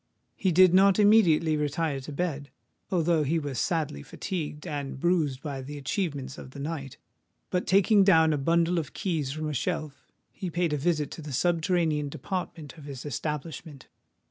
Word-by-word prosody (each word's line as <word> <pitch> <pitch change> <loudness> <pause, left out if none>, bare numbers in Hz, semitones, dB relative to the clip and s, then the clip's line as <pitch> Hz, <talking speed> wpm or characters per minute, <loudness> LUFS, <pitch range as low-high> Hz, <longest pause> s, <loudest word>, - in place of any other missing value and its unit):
He 190 - +1
did 180 +1 +6
not 195 +1 +6
immediately 185 -7 +5
retire 150 0 -1
to 135 +3 -8
bed, 145 -2 -3 0.4
although 170 -3 +2
he 150 +3 +1
was 145 -6 -3
sadly 155 - -1
fatigued 155 - -5
and 145 -5 -4
bruised 155 -6 +1
by 140 -3 -4
the 145 +3 -7
achievements 140 -3 -3
of - - -9
the 140 - -11
night; 140 -2 -5 0.5
but, 180 - -1
taking 200 +2 +5
down 160 -5 +5
a - - 0
bundle 170 +4 +2
of 155 - -6
keys 160 -9 -2
from 155 +2 -4
a 150 - -3
shelf, 155 -1 -4 0.2
he 185 -3 -5
paid 170 -1 0
a - - +2
visit 150 -1 0
to - - -7
the 150 -1 -7
subterranean 160 0 +1
department 160 0 -5
of 145 - -12
his 140 -2 -8
establishment. 150 0 -5
155 Hz, 170 wpm, -27 LUFS, 145-175 Hz, 0.5 s, did